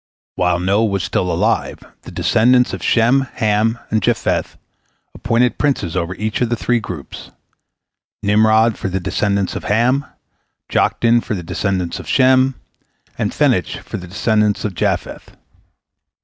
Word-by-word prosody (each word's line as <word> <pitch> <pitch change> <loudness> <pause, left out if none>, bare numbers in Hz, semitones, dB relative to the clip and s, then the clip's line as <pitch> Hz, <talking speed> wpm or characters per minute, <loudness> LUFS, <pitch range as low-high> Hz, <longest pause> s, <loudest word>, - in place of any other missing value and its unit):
While 90 -1 +1
Noah 100 +5 +2
was 100 -3 -2
still 90 - -1
alive, 85 - 0 0.2
the - - -11
descendants 125 +2 +3
of - - -5
Shem, 120 +4 +3
Ham, 110 0 +1
and 110 0 +1
Japheth - - -1 0.6
appointed 120 +1 0
princes 120 - 0
over 90 0 -2
each 110 +4 -3
of 120 - +1
the 120 - +1
three 120 +1 0
groups—Nimrod 110 +4 -2
for 95 - -3
the 95 +1 -2
descendants 100 +2 -1
of - - -6
Ham, 125 +6 +1 0.6
Joktan 120 0 +2
for 110 - -4
the 90 - -6
descendants 90 0 -2
of - - -9
Shem, 130 0 +4 0.6
and - - 0
Phenech - - 0
for - - -6
the 90 - -9
descendants 105 +2 0
of 105 - -2
Japheth. - - -3
110 Hz, 140 wpm, -18 LUFS, 95-120 Hz, 0.6 s, Shem